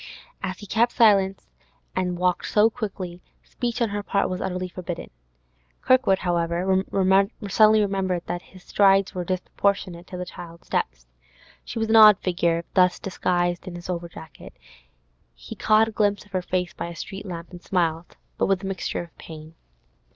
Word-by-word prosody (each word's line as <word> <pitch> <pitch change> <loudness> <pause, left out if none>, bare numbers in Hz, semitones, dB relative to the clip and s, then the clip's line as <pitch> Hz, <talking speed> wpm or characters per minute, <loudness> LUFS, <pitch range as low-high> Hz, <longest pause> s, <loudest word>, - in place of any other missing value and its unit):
As 185 -1 -4
he 205 - -10
kept 230 +4 +1
silence 195 -5 +3 0.5
and 180 -1 -1
walked 180 0 0
so 215 +2 +4
quickly, 185 -5 -6 0.2
speech 240 -1 -3
on 230 - 0
her 205 0 -3
part 200 -1 0
was 185 - -3
utterly 185 0 -3
forbidden. 180 -1 -7 0.7
Kirkwood, 255 -7 +4
however, 175 +2 0 0.6
suddenly 215 +2 +5
remembered 190 -3 -1
that 175 - -4
his 185 0 -17
strides 195 -1 +3
were 180 - -3
disproportionate 185 0 -2
to 180 - -7
the 180 - -4
child's 170 -1 -11
steps. - - -2 0.6
She - - -7
was 225 0 -1
an 225 - +5
odd 215 -2 +9
figure 170 -3 0
thus 180 -1 +4
disguised 175 -1 -1
in 180 - -6
his 175 +1 -6
over 170 -1 -4
jacket; 160 -2 -12 0.8
he 60 +1 -10
caught 215 +1 +3
a - - -8
glimpse 205 -2 0
of 205 - -23
her 185 -1 -1
face 180 -1 -2
by - - -5
a 170 - -8
street 195 +3 -7
lamp, 170 -2 -7
and 175 -1 -10
smiled, 170 -3 -1 0.2
but - - +2
with 195 0 +1
a - - -4
mixture 190 -2 -3
of 170 - -16
pain. 155 0 -11
185 Hz, 175 wpm, -24 LUFS, 175-200 Hz, 0.8 s, odd